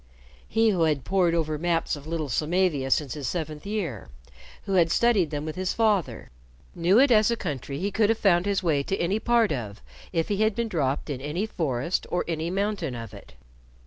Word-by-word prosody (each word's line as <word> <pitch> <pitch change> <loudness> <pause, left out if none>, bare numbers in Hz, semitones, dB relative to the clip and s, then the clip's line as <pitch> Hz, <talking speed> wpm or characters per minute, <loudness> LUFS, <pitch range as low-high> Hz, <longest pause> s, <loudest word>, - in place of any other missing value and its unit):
He 225 0 +3
who 180 -4 0
had 150 -4 0
pored 180 -3 +2
over 155 -2 -1
maps 165 -1 0
of 145 +1 -11
little 160 -2 -2
Samavia 155 0 0
since 140 -1 +1
his 145 -4 -5
seventh 155 +1 -4
year, 175 - -4 0.5
who 195 - -3
had 170 -3 +4
studied 210 -5 +3
them 145 0 -4
with 155 - -5
his 185 0 -2
father, 215 -6 0 0.4
knew 175 +4 +3
it 270 +1 +5
as 215 -1 +5
a 235 - +1
country 140 - -4
he 195 +6 -2
could 215 +1 +2
have 225 - +2
found 185 -3 +3
his 200 -1 0
way 155 -5 +2
to 190 +7 -2
any 190 +5 0
part 235 -2 +2
of 110 -7 -4 0.3
if 165 -2 -1
he 205 - 0
had 215 0 +2
been 235 0 -1
dropped 145 -4 -1
in 130 -2 -5
any 155 +8 -2
forest 160 - -2
or 175 - -1
any 165 0 -2
mountain 195 -7 -2
of 115 -3 -8
it. - - -13
170 Hz, 210 wpm, -26 LUFS, 150-200 Hz, 0.5 s, it